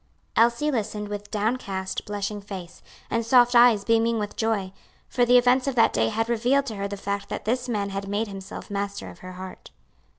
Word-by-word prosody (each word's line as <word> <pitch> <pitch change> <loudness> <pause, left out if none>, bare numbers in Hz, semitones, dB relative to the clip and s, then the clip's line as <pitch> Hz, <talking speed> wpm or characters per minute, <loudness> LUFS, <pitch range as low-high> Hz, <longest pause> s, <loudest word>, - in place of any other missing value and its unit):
Elsie 235 +6 +3
listened 210 -4 -3
with 205 0 -6
downcast, 205 -4 -2
blushing 205 0 -4
face, 190 -4 -9 0.3
and 230 0 +1
soft 245 +1 +5
eyes 235 -4 +6
beaming 230 +1 +2
with 210 -1 -4
joy; 210 -4 -1 0.3
for 245 -2 +2
the 245 +1 +6
events 250 +2 +3
of 275 - -1
that 230 - +4
day 110 0 +2
had 225 - -1
revealed 245 +4 +2
to 225 - -5
her 200 0 -3
the 200 0 -6
fact 200 0 -4
that - - -5
this 250 +3 -1
man 200 -3 -1
had 195 0 -4
made 205 +3 -1
himself 195 0 -8
master 200 0 -3
of - - -16
her 185 0 -9
heart. 185 0 -9
210 Hz, 200 wpm, -25 LUFS, 200-235 Hz, 0.3 s, eyes